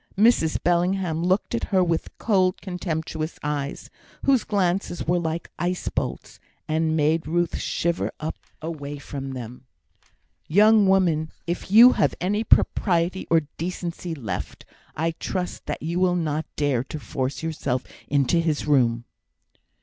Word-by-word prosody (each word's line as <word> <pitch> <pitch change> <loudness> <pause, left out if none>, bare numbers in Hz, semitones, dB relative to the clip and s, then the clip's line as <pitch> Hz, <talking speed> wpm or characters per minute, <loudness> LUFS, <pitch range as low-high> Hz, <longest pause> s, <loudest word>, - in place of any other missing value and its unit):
Mrs 205 -7 +4
Bellingham 175 -1 +1
looked 185 +6 +1
at 235 - -1
her 190 -3 +2
with 165 -2 -2
cold, 185 -4 +2
contemptuous 160 -4 -4
eyes, 145 -1 -3 0.3
whose 265 -4 +3
glances 190 -3 -1
were 175 +2 +2
like 165 0 -3
ice 180 +2 -1
bolts, - - -4 0.3
and 160 0 +1
made 155 +1 +2
Ruth 175 +1 0
shiver 170 0 -1
up 155 +1 -4 0.2
away 145 -3 -5
from 135 -1 -6
them. 125 +1 -8 0.8
"Young 210 +4 +5
woman, 170 -5 +3 0.2
if 175 +2 -4
you 230 +5 +9
have 210 - +1
any 205 +4 0
propriety 180 -4 +2
or 165 -1 +5 0.2
decency 175 0 -4
left, 105 - -5 0.3
I 165 +2 0
trust 180 +2 -4
that - - -4
you 170 +3 -1
will 185 -1 +3
not 155 -2 -1
dare 140 -5 +1
to 155 - -6
force 130 0 -3
yourself 140 -6 -2 0.2
into 140 +3 +2
his 160 -3 0
room." 120 -5 +2
165 Hz, 140 wpm, -24 LUFS, 150-185 Hz, 0.8 s, you